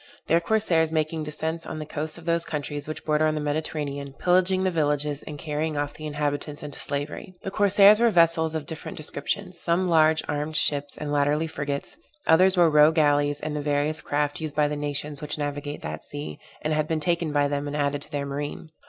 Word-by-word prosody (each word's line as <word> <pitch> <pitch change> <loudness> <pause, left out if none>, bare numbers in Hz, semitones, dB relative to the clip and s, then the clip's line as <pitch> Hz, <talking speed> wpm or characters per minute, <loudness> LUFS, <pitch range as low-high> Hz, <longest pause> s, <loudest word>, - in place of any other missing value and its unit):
Their 165 - +3
corsairs 170 -4 +2
making 155 0 -1
descents 160 +2 -2
on - - -6
the 155 - -5
coasts 155 +1 -3
of 170 - -12
those 170 0 +1
countries 145 -2 -4
which 155 - -6
border 155 0 +2
on 155 - 0
the - - -1
Mediterranean, 145 -2 -3
pillaging 185 +1 +3
the 185 - +1
villages 150 -2 0
and 150 - -6
carrying 150 0 -3
off 145 0 -2
the 155 - -7
inhabitants 145 0 -3
into 145 -1 -5
slavery. 145 +6 -4
The 195 - -4
corsairs 205 +1 +6
were 235 0 +5
vessels 165 -4 +4
of 155 -2 -3
different 160 +1 -7
descriptions; 175 +5 -3
some 175 +2 +1
large 160 -2 +4
armed 150 +1 -1
ships, 145 -5 +2
and 150 -1 -4
latterly 145 +2 +2
frigates; 145 - -4 0.3
others 185 +3 +5
were 175 -1 +6
row 150 0 +6
gallies 145 -2 +2
and 155 0 -3
the 150 - -2
various 145 +1 0
craft 145 +3 -1
used 155 -2 -4
by 150 -1 +3
the 150 - -3
nations 145 0 -3
which 150 0 -4
navigate 145 0 -4
that 75 +1 -5
sea, 75 +1 -7 0.2
and 155 - 0
had 155 0 0
been 160 -1 0
taken 170 0 0
by 145 -1 +2
them 145 0 -2
and 145 +1 -3
added 145 -1 0
to - - -7
their 145 -1 -2
marine. 145 +3 -5
150 Hz, 210 wpm, -25 LUFS, 145-160 Hz, 0.3 s, corsairs